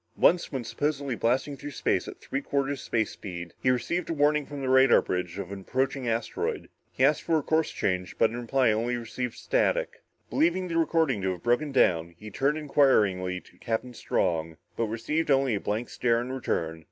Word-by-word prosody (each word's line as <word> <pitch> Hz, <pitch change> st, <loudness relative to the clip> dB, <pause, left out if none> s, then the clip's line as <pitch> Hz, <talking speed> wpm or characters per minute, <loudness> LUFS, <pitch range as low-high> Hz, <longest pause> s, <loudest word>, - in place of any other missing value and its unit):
Once, 175 Hz, 0 st, +3 dB
when 130 Hz, -3 st, -3 dB
supposedly 140 Hz, +2 st, -2 dB
blasting 130 Hz, +5 st, 0 dB
through 145 Hz, +2 st, -7 dB
space 140 Hz, -, 0 dB
at -, -, -9 dB
three 140 Hz, -, -3 dB
quarters 140 Hz, -1 st, -1 dB
space 110 Hz, -3 st, -1 dB
speed, 85 Hz, -4 st, -7 dB
he 130 Hz, -, +2 dB
received 150 Hz, +8 st, 0 dB
a -, -, 0 dB
warning 150 Hz, -1 st, +2 dB
from 145 Hz, -1 st, -7 dB
the 135 Hz, -, -3 dB
radar 130 Hz, -1 st, +6 dB
bridge 90 Hz, 0 st, -3 dB
of 100 Hz, -1 st, -5 dB
an 100 Hz, -, -5 dB
approaching 130 Hz, +4 st, -1 dB
asteroid. 275 Hz, -, -2 dB, 0.2 s
He -, -, +2 dB
asked -, -, +3 dB
for 165 Hz, -1 st, +1 dB
a 150 Hz, -, -1 dB
course 160 Hz, +2 st, +1 dB
change, 90 Hz, -1 st, -2 dB
but 115 Hz, -, +3 dB
in 120 Hz, +1 st, -4 dB
reply 125 Hz, 0 st, +2 dB
received 120 Hz, +2 st, -2 dB
only -, -, -16 dB
static. -, -, 0 dB, 0.3 s
Believing 185 Hz, -, +1 dB
the 165 Hz, -, -1 dB
recording 160 Hz, -9 st, +2 dB
to 95 Hz, 0 st, 0 dB
have 90 Hz, -, -11 dB
broken 120 Hz, +5 st, +1 dB
down, 85 Hz, -9 st, +2 dB
he 105 Hz, +3 st, -10 dB
turned 140 Hz, +7 st, +1 dB
inquiringly 105 Hz, -11 st, +2 dB
to -, -, -22 dB
Captain 120 Hz, +1 st, -3 dB
Strong, 80 Hz, -7 st, -1 dB, 0.2 s
but 115 Hz, -, 0 dB
received 115 Hz, +9 st, -2 dB
only 135 Hz, -3 st, +3 dB
a 100 Hz, -, 0 dB
blank 110 Hz, +5 st, -2 dB
stare 115 Hz, -1 st, +1 dB
in 125 Hz, +2 st, -4 dB
return. 80 Hz, -11 st, -2 dB
125 Hz, 200 wpm, -27 LUFS, 105-145 Hz, 0.3 s, radar